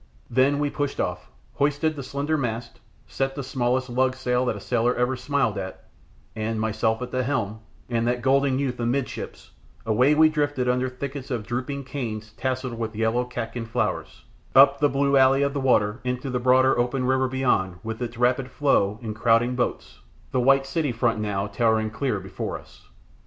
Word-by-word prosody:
Then 130 +4 +3
we 145 0 0
pushed 145 -2 -3
off, - - -3 0.2
hoisted 145 +2 +1
the 140 - -5
slender 140 +4 -2
mast, 115 -4 -3 0.3
set 135 0 -2
the 140 - -4
smallest 130 0 0
lug 130 +1 +1
sail 125 -1 0
that 125 - +1
ever - - -6
a - - -7
sailor 125 +3 +1
smiled 125 -5 0
at, 95 -1 -7 0.5
and, 110 0 -2
myself 110 +2 0
at 125 - -7
the 130 - 0
helm, 115 -5 -2 0.3
and 115 -1 0
that 120 0 -1
golden 135 0 +3
youth 130 -3 -2
amidships, 120 +3 -3 0.3
away 125 +7 +3
we 160 +1 +7
drifted 145 -4 0
under 125 +1 +1
thickets 135 +1 -6
of 120 -5 -3
drooping 130 +4 -3
canes 115 -5 -5
tasselled 130 -2 -3
with 110 -1 -3
yellow 115 +3 +1
catkin 115 -1 -5
flowers, 120 +2 -2 0.3
up 140 +1 +7
the 145 0 +4
blue 140 0 +2
alley 135 +1 +5
of 140 0 0
the 140 - -2
water 110 -4 +2
into 125 +1 -3
the 125 - 0
broader 130 +1 +4
open 125 +1 0
river 130 0 +2
beyond 125 -9 0
with 110 +1 -5
its 120 -1 -4
rapid 125 +1 +1
flow 110 -8 +1
and 110 -2 -4
crowding 115 +2 +3
boats, 125 - -3 0.3
the 130 - +1
white 135 +2 +4
city 145 0 -1
front 115 -1 0
now 100 -2 -1
towering 110 +1 +1
clear 115 -2 -1
before 95 0 -5
us. - - -18
125 Hz, 185 wpm, -25 LUFS, 115-135 Hz, 0.5 s, we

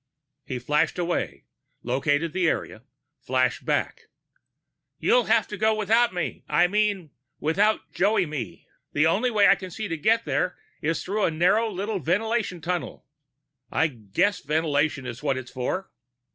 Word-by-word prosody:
He 130 - -4
flashed 150 +7 0
away, 175 0 -2 0.4
located 145 +6 0
the 180 -3 +2
area, - - -3 0.4
flashed - - 0
back. - - -1 0.9
"You'll - - +3
have - - +3
to 210 - -5
go 220 +2 +2
without 225 +3 +3
me 175 -3 -4
I 175 - +4
mean 200 -4 0 0.3
without 200 +8 +2
Joey 200 0 +2
me. 120 - -6 0.3
The 150 +2 +3
only 195 +10 +2
way 210 -4 +4
I 195 - +7
see 205 +4 -5
to 165 -3 -3
get 225 +8 +2
there 180 - -1 0.2
is 160 +2 -1
through 205 +2 0
a - - +2
narrow 185 +8 +2
little 200 +1 -3
ventilation 200 +2 -1
tunnel 170 -6 -4 0.7
I - - +2
guess 125 - 0
ventilation 150 -2 0
is 125 0 -6
what 140 -3 0
it - - -2
was 125 - -14
for." 130 +9 -3
175 Hz, 155 wpm, -25 LUFS, 150-210 Hz, 0.9 s, I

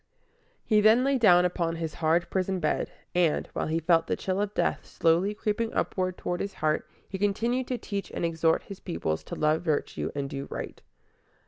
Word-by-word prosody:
He 215 -2 +4
then 220 +4 +6
lay 275 -1 +2
down 180 -5 +6
upon 170 -2 -1
his 165 -1 -4
hard 165 +2 +2
prison 190 0 0
bed, 155 -3 -1 0.2
and, 175 -4 +2
while - - -2
he 160 +1 0
felt 165 0 +3
the - - 0
chill 190 +1 -2
of 205 -1 -1
death - - 0
slowly 175 +5 +1
creeping 220 +2 -1
upward 185 -1 -1
toward 175 0 -3
his 200 - -4
heart, 155 0 0 0.2
he 190 - -6
continued 235 +6 0
to 250 - -1
teach 200 -4 -5
and - - -2
exhort 165 -1 +1
his 200 - -9
pupils 80 -1 -3
to - - -6
love 155 +1 +2
virtue 155 -4 -1
and 140 -1 -2
do 140 0 -5
right. - - -6
180 Hz, 195 wpm, -28 LUFS, 160-205 Hz, 0.2 s, then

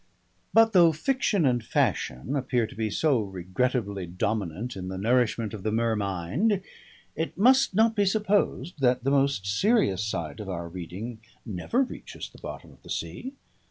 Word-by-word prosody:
But 225 0 +5
though 170 -3 +7
fiction 200 - +1
and 120 -3 +2
fashion 105 - 0
appear 125 -3 +1
to - - -10
be 110 -1 -2
so 130 +3 +2
regrettably 100 +1 -2
dominant 100 +3 -2
in 95 -1 -6
the 95 0 -4
nourishment 115 0 +1
of 105 - -6
the 110 - -1
mer 115 0 +1
mind, 100 - 0 0.5
it 160 +1 -3
must 255 0 +4
not 225 +1 +4
be 205 -1 +3
supposed 195 - 0
that 125 -1 +3
the 135 - +1
most 140 -7 +2
serious 110 - +2
side 90 -3 -4
of 105 -2 -6
our 85 -2 -4
reading 95 +7 -7 0.3
never 115 - 0
reaches 255 - -8
the - - -16
bottom - - -8
of - - -20
the - - -15
sea. 260 +2 -4
120 Hz, 165 wpm, -27 LUFS, -, 0.5 s, though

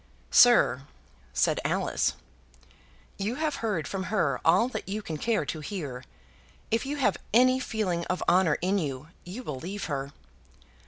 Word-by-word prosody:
"Sir," 145 - +6 0.4
said - - +1
Alice, - - 0 1.1
"you 210 +5 -1
have 305 0 -1
heard 210 -9 -2
from 190 -1 -3
her 165 -12 0
all 185 +8 +4
that 255 - -6
you 210 +2 -3
can 160 -4 -4
care 220 -2 0
to 155 - -4
hear. 145 -7 -5 0.7
If 230 +4 0
you 290 - -2
have 210 -8 +2 0.2
any 255 +2 +5
feeling 200 -9 -1
of 185 - -2
honour 180 -4 +4
in 195 +2 +2
you, 145 -2 -4 0.2
you 200 +9 -7
will 140 - -5
leave 195 +7 -5
her." 140 -2 -3
190 Hz, 155 wpm, -28 LUFS, 155-225 Hz, 1.1 s, Sir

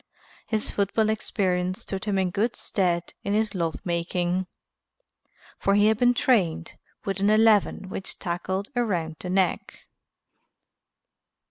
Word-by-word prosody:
His 215 -2 -1
football 215 +2 +1
experience 185 -4 -1
stood 195 +2 -5
him 205 -2 0
in 185 -2 +1
good 220 +5 0
stead 175 -3 -1
in 200 +1 -1
his 215 -1 +1
love 165 -4 -1
making, 175 +1 -1 1.1
for 200 - +2
he 205 0 +5
had 220 0 +1
been 245 0 +4
trained 195 - +1 0.3
with 195 -1 -1
an 200 +1 +3
eleven 215 -3 +4
which 190 0 -5
tackled 185 +3 -3
around 175 -10 -1
the 180 - -6
neck. 185 -1 -1
195 Hz, 130 wpm, -26 LUFS, 180-215 Hz, 1.1 s, he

